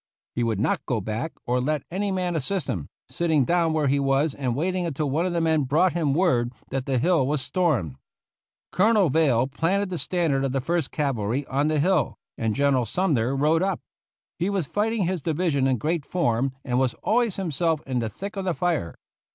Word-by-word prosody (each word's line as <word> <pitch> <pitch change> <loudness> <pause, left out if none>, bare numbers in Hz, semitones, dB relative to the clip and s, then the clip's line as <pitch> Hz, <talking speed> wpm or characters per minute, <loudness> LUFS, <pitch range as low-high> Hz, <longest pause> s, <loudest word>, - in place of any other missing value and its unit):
He 120 - -2
would 115 -4 0
not 110 - 0
go 125 -4 0
back 110 +9 -3
or 125 +1 +1
let 150 +3 -1
any 200 +3 -1
man 180 -2 -1
assist 170 +4 -1
him, 90 - -3 0.2
sitting 160 -6 +1
down 170 0 +2
where 155 -1 +1
he 140 +1 +2
was 135 +2 +2
and 130 -5 -2
wait 175 +7 0
ing 180 -2 -1
until 150 -2 -2
one 165 +6 +1
of 180 - -2
the 170 - +1
men 160 -2 +2
brought 155 +7 +2
him 155 -5 +1
word 125 -9 +2 0.2
that 135 0 -2
the 135 -2 +1
hill 155 0 +2
was 150 +1 0
stormed. 130 - 0 0.7
Colonel 205 -4 +3
Veile 135 -6 +3
planted 185 +8 -1
the 175 - -3
standard 160 -7 0
of 135 -1 -1
the 135 - +1
First 165 +2 -1
Cavalry 135 -2 -1
on 140 +3 0
the 155 -1 +1
hill, 175 0 +1 0.2
and 110 -2 -1
General 140 -3 +2
Sumner 135 - 0
rode 155 +4 +2
up. 190 -1 0 0.6
He 180 +3 +1
was 195 -5 0
fighting 210 +4 0
his 180 -1 -1
division 155 -4 +1
in 130 -1 +2
great 155 +7 -1
form, 135 -6 0
and 125 -2 +1
was 130 -2 +1
always 230 -2 +2
himself 165 -3 0
in 130 -2 -1
the 115 -2 -2
thick 200 - -7
of 195 - -3
the 180 -3 -1
fire. 170 - -1
150 Hz, 210 wpm, -25 LUFS, 130-175 Hz, 0.7 s, Colonel